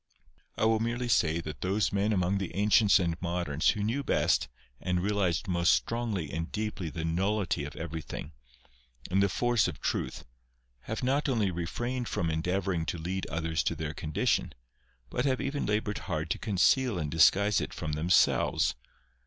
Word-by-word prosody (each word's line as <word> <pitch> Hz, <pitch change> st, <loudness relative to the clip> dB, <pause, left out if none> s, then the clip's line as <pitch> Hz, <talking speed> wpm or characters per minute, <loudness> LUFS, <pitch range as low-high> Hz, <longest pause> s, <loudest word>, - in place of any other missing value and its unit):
I -, -, +2 dB
will 110 Hz, 0 st, +3 dB
merely 120 Hz, +2 st, -1 dB
say 85 Hz, -7 st, +2 dB
that 75 Hz, -2 st, -7 dB
those 100 Hz, +3 st, 0 dB
men 100 Hz, +2 st, +1 dB
among 95 Hz, -1 st, +1 dB
the 95 Hz, -, -5 dB
ancients 105 Hz, +1 st, +5 dB
and 85 Hz, -2 st, -1 dB
moderns 85 Hz, -4 st, 0 dB
who 105 Hz, -3 st, 0 dB
knew 120 Hz, +7 st, -1 dB
best -, -, +2 dB, 0.3 s
and 90 Hz, -1 st, 0 dB
realised 100 Hz, -1 st, 0 dB
most 85 Hz, -3 st, +3 dB
strongly 110 Hz, -10 st, -1 dB
and 80 Hz, +1 st, -4 dB
deeply 105 Hz, -5 st, -3 dB
the 80 Hz, +1 st, -4 dB
nullity 95 Hz, -2 st, 0 dB
of 75 Hz, -, -8 dB
everything, 80 Hz, -1 st, -6 dB, 0.8 s
and 95 Hz, +2 st, +3 dB
the 100 Hz, -, +3 dB
force 120 Hz, +1 st, +2 dB
of 75 Hz, -7 st, -6 dB
truth, -, -, -3 dB, 0.6 s
have 110 Hz, +3 st, -4 dB
not 140 Hz, +3 st, +1 dB
only 110 Hz, -7 st, +1 dB
refrained 120 Hz, +9 st, -3 dB
from 85 Hz, -1 st, -1 dB
endeavouring 90 Hz, +1 st, -1 dB
to 80 Hz, -, -2 dB
lead 90 Hz, +4 st, -3 dB
others 80 Hz, 0 st, -1 dB
to -, -, -1 dB
their 75 Hz, -1 st, -4 dB
condition, 75 Hz, -1 st, 0 dB, 0.6 s
but 125 Hz, -, -1 dB
have 130 Hz, -2 st, +1 dB
even 145 Hz, 0 st, -2 dB
laboured 105 Hz, 0 st, -1 dB
hard 80 Hz, -2 st, -3 dB
to -, -, -1 dB
conceal 110 Hz, +3 st, +2 dB
and 75 Hz, -4 st, -3 dB
disguise 100 Hz, +5 st, +4 dB
it -, -, -4 dB
from 80 Hz, -, -4 dB
themselves. 80 Hz, +4 st, +3 dB
95 Hz, 170 wpm, -29 LUFS, 80-110 Hz, 0.8 s, ancients